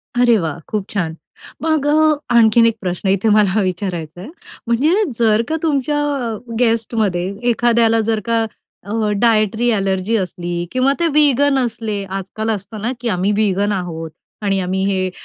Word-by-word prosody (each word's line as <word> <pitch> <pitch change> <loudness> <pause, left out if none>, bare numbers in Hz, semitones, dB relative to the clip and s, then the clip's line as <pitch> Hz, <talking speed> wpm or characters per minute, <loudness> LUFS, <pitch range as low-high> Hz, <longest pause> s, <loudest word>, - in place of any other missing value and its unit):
अरे 245 -2 +4
वाह, 165 -4 -3
खूप 210 -3 -2
छान! 170 -6 -2 0.5
मग 315 -2 0
अ, 310 +1 +4 0.2
आणखीन 230 0 +5
एक 230 -1 +2
प्रश्न 180 +1 -2
इथे 195 +3 +2
मला 210 -1 +3
विचारायचा 180 -3 -4
आहे. 200 - -9 0.4
म्हणजे 305 - +2 0.2
जर 220 -1 +3
का 320 - -1
तुमच्या 295 -1 0 0.6
गेस्टमध्ये 225 -6 0 0.2
एखाद्याला 230 -1 +3
जर 220 -1 +1
का 230 -1 +1 0.4
अ, 210 +2 -1
डायटरी 225 0 +2
ॲलर्जी 195 0 0
असली 175 -2 -3
किंवा 255 +2 +2
ते 340 - +2
वीगन 285 -2 +3
असले, 220 -3 -4
आजकाल 195 +3 -5
असतं 205 +1 -5
ना 230 +4 -1
की 240 - -4
"आम्ही 190 0 0
वीगन 205 -1 +1
आहोत" 165 -4 -4 0.3
आणि 195 -2 0
"आम्ही 190 +1 -1
हे 190 -1 0
215 Hz, 155 wpm, -18 LUFS, 190-235 Hz, 0.6 s, आणखीन